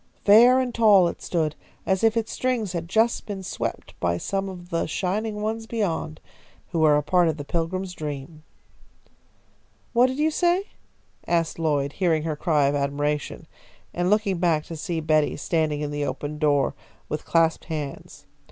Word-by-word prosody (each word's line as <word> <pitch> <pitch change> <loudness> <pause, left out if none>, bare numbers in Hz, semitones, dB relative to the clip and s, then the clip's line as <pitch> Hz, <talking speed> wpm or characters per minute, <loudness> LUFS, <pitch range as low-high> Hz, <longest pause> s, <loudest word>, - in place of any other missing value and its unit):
Fair 240 +5 +7
and 250 -2 -1
tall 210 -6 +5
it - - -5
stood, 160 -4 -1 0.3
as 190 +1 0
if 225 0 +3
its 225 -1 -1
strings 240 -7 -1
had 170 -1 -4
just 225 +4 +1
been 200 -2 -5
swept - - -5
by 85 0 0
some 195 - -2
of 175 -1 -10
the 165 - 0
Shining 210 +5 -2
Ones 225 +1 -3
beyond, 170 -9 -2 0.5
who 165 - -1
were 155 -2 +5
a 150 - 0
part 175 +3 +3
of 160 -1 -1
the 145 - -5
Pilgrim's 180 +4 -2
dream. 150 0 -6 1.5
"What 245 +1 +5
did 260 +1 -4
you 310 +2 +2
say?" 355 +5 +1 0.6
asked 165 -1 0
Lloyd, 145 -3 0
hearing 165 -5 +1
her 160 -2 -2
cry 150 -2 +2
of 140 - +2
admiration, 145 +1 -2 0.5
and 175 +1 0
looking 205 -3 +1
back 165 -3 +2
to 165 - -8
see 165 +1 -3
Betty 155 -1 +2
standing 155 -1 0
in 145 -1 -3
the 145 0 -2
open 150 +1 -4
door 145 -3 +2 0.3
with 150 - -4
clasped 165 -1 +2
hands. 150 -4 -6
170 Hz, 170 wpm, -24 LUFS, 150-210 Hz, 1.5 s, Fair